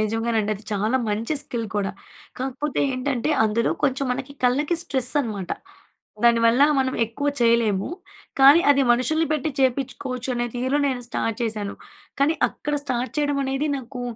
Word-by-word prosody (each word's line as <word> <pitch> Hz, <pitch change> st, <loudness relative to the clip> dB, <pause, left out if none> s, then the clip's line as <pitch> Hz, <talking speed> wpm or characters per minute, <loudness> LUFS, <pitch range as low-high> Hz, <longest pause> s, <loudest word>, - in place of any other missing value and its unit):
నిజంగానండి 225 Hz, 0 st, 0 dB
అది 210 Hz, +1 st, -12 dB
చాలా 215 Hz, +5 st, +1 dB
మంచి 220 Hz, +8 st, -1 dB
స్కిల్ 235 Hz, -5 st, -4 dB
కూడా. 200 Hz, -1 st, 0 dB, 0.5 s
కాకపోతే 270 Hz, +3 st, -2 dB
ఏంటంటే 255 Hz, +1 st, -1 dB
అందులో 220 Hz, +2 st, +1 dB
కొంచెం 275 Hz, -1 st, +1 dB
మనకి 265 Hz, +2 st, -5 dB
కళ్ళకి 285 Hz, +7 st, +2 dB
స్ట్రెస్ 260 Hz, -5 st, +1 dB
అనమాట. 205 Hz, -8 st, -5 dB, 0.7 s
దానివల్ల 235 Hz, +2 st, +5 dB, 0.2 s
మనం 260 Hz, -1 st, 0 dB
ఎక్కువ 255 Hz, +6 st, -3 dB
చేయలేము. 230 Hz, -4 st, +2 dB, 0.5 s
కానీ 280 Hz, +5 st, +8 dB
అది 280 Hz, -1 st, +4 dB
మనుషుల్ని 315 Hz, +7 st, +1 dB
పెట్టి 305 Hz, 0 st, -1 dB
చేపించుకోవచ్చు 260 Hz, -1 st, -1 dB
అనే 240 Hz, 0 st, -1 dB
తీరు 260 Hz, +4 st, 0 dB
నేను 255 Hz, -2 st, -2 dB
స్టార్ట్ 225 Hz, -2 st, -2 dB
చేశాను. 215 Hz, -3 st, -3 dB, 0.5 s
కానీ 295 Hz, +3 st, +3 dB
అక్కడ 295 Hz, 0 st, -4 dB
స్టార్ట్ 255 Hz, -2 st, -2 dB
చేయడం 290 Hz, -1 st, +1 dB
అనేది 270 Hz, +3 st, -1 dB
నాకు 255 Hz, -1 st, -7 dB
250 Hz, 145 wpm, -23 LUFS, 230-275 Hz, 0.7 s, కానీ